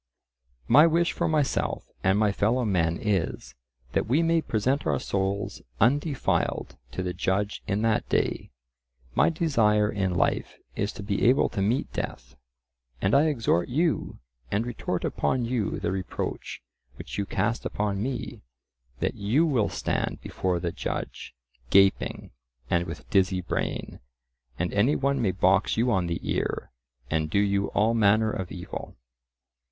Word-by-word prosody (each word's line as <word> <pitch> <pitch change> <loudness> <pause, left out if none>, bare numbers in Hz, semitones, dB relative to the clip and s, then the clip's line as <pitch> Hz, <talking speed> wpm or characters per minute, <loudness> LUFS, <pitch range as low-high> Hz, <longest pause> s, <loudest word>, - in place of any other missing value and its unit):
My 150 +3 +7
wish 170 +1 +2
for - - -1
myself 150 -3 0 0.2
and 95 +1 +3
my 105 -1 +3
fellow 115 +5 +1
men 85 -5 +1
is, 100 -6 -1 0.4
that - - 0
we 145 +8 +3
may 165 0 +3
present 130 +3 0
our 70 -3 +1
souls 100 +1 -2 0.2
undefiled 140 +3 +1 0.2
to 95 - -3
the 90 -1 -2
judge 100 +4 -1
in 105 +1 0
that 115 -1 +1
day; - - 0 0.6
my - - +4
desire 110 -11 +2
in 95 -3 -1
life - - 0 0.2
is 100 +1 -1
to 100 - -8
be 100 -1 -1
able 130 - +3
to 100 - -3
meet 110 +7 0
death. 65 +3 -5 0.6
And 95 - +1
I 140 +3 +6
exhort 115 - +1
you, 160 +6 0 0.3
and 105 +3 0
retort 120 -4 -3
upon 125 -2 0
you 115 -4 -1
the - - -1
reproach 95 -1 -4 0.3
which - - -7
you 100 - -1
cast 110 +5 -1
upon 100 -1 -2
me,—that 60 - -6
you 115 +11 +2
will 125 -10 +1
stand - - -2
before 90 -2 -2
the 85 0 -2
judge, - - -5 0.3
gaping, 95 0 +3 0.4
and 85 0 +2
with 80 - -8
dizzy 95 -1 +3
brain, 90 - -3 0.6
and 90 0 -2
any 115 +9 +3
one 140 -1 +1
may 105 - +2
box 95 +3 +2
you 120 +2 +2
on 90 -4 +1
the 85 0 -2
ear, - - -2 0.4
and 80 -1 0
do 90 - 0
you 100 0 +2
all 110 +2 +3
manner 110 0 +3
of 90 -2 -4
evil. 90 -1 -7
105 Hz, 150 wpm, -27 LUFS, 95-125 Hz, 0.6 s, My